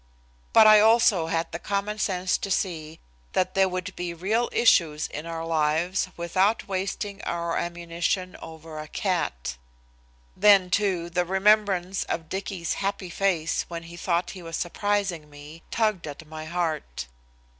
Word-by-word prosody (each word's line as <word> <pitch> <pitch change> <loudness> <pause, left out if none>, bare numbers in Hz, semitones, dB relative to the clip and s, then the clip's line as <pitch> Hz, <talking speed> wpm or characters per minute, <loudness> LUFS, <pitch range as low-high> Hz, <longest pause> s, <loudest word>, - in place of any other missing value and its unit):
But - - +7
I 215 0 +9
also 215 -6 +4
had 165 0 -1
the 170 - -5
common 205 +2 -2
sense 185 -3 0
to 200 - -4
see 165 -5 -2 0.3
that 185 0 +1
there 190 -1 +3
would 185 +1 -4
be 175 -1 -4
real 215 +8 0
issues 160 -10 +3
in 150 +3 -6
our 165 0 -4
lives 165 +4 +1
without 185 +5 +1
wasting 195 +1 -3
our 170 0 -2
ammunition 175 +2 -2
over 160 -1 -9
a 155 - -7
cat. 155 - -2 0.8
Then, 195 -3 +5
too, 180 -3 0
the 180 0 +1
remembrance 190 0 +2
of 160 -1 -4
Dicky's 190 -2 -3
happy 195 -2 -2
face 170 -4 0
when 170 -1 -6
he 170 +1 -11
thought 175 0 -1
he 185 - -9
was 165 -1 -5
surprising 190 -4 -1
me 145 +3 -12
tugged 215 -7 0
at 150 +2 -8
my 155 0 -7
heart. 155 - -3
175 Hz, 150 wpm, -26 LUFS, 165-195 Hz, 0.8 s, I